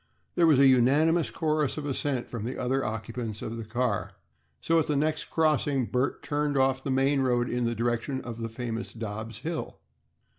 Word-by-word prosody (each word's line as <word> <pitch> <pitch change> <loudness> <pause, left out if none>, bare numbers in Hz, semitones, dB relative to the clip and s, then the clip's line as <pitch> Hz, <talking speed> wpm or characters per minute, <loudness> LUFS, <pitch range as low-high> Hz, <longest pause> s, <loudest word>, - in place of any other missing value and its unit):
There 170 -2 +4
was 155 -4 +6
a 140 - +6
unanimous 145 +6 +4
chorus 155 -3 0
of 150 - -4
assent 135 -2 -2
from 115 -4 -5
the 125 +3 -4
other 130 +2 0
occupants 110 0 -4
of 115 - -4
the 115 - -5
car, 110 -1 -1 0.5
so 165 0 +2
at 155 - 0
the 150 - +1
next 155 +2 0
crossing 145 -4 +1
Bert 125 +3 -1
turned 145 -1 0
off 130 0 +2
the - - -3
main 135 +1 +2
road 120 -2 +2
in 125 -1 -1
the 115 0 0
direction 120 +3 -1
of 115 -1 -7
the 115 0 -3
famous 115 0 -5
Dobb's 110 0 -6
hill. 165 0 -4
130 Hz, 190 wpm, -28 LUFS, 115-145 Hz, 0.5 s, was